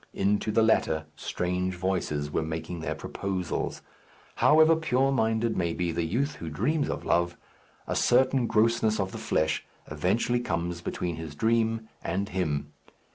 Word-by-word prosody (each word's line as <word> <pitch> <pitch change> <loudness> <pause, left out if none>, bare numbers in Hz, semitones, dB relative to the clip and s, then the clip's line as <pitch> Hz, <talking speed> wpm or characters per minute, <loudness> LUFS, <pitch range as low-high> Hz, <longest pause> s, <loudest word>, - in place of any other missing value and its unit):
Into 100 +2 +1
the 115 - +4
latter 80 -8 +2
strange 90 +1 -2
voices 85 -6 -1
were - - 0
making 80 +2 -4
their 80 - -3
proposals. 95 -3 -3 0.5
However 160 +2 +6
pure 135 -4 +1
minded 110 -2 +1
may 85 -2 0
be 90 -1 -1
the 85 +1 -1
youth 130 - -1
who 85 - -6
dreams 140 - 0
of - - -4
love, 85 0 +1 0.5
a - - -2
certain 130 0 +3
grossness 110 0 +2
of 95 -1 -1
the - - -6
flesh 80 0 0 0.3
eventually 95 +10 +1
comes 85 -5 -2
between 85 -1 -3
his 80 -2 -7
dream 115 +3 +1
and 100 +4 -2
him. 75 -5 -2
95 Hz, 150 wpm, -28 LUFS, 85-115 Hz, 0.5 s, However